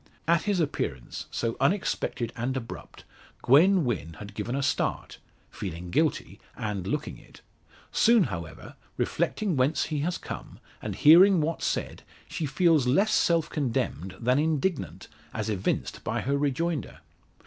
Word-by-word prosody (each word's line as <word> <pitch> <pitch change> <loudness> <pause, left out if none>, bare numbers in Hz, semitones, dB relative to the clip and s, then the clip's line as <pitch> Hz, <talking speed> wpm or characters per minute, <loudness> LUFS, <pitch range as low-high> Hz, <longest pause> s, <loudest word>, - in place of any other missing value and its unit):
At 170 0 +4
his 205 -3 +1
appearance, 70 - -3
so 115 -1 -2
unexpected 135 - 0
and 125 +3 -2
abrupt, 115 -3 -8 0.4
Gwen 170 +6 +5
Wynn 80 -9 -2
had 100 -1 -9
given 110 +4 -3
a 140 - -1
start - - -1 0.3
feeling 90 -2 -6
guilty, 155 - 0 0.2
and 100 -4 -3
looking 150 +7 -3
it. - - -18 0.5
Soon, 230 -3 +5
however, 85 - -6 0.2
reflecting 205 -6 -1
whence 135 +4 +2
he 155 -2 -2
has 170 +5 -1
come, - - -8 0.2
and - - -4
hearing 180 +5 +7
what 160 +2 -1
said, - - -2 0.3
she 155 - -3
feels 155 -2 +3
less 200 +12 +3
self 165 -5 +3
condemned 120 - -2
than 125 +3 +2
indignant, 160 +2 -1 0.3
as 110 -1 -2
evinced 95 -2 -2
by - - -2
her 140 +2 0
rejoinder. 145 +3 -2
140 Hz, 140 wpm, -27 LUFS, 115-165 Hz, 0.5 s, hearing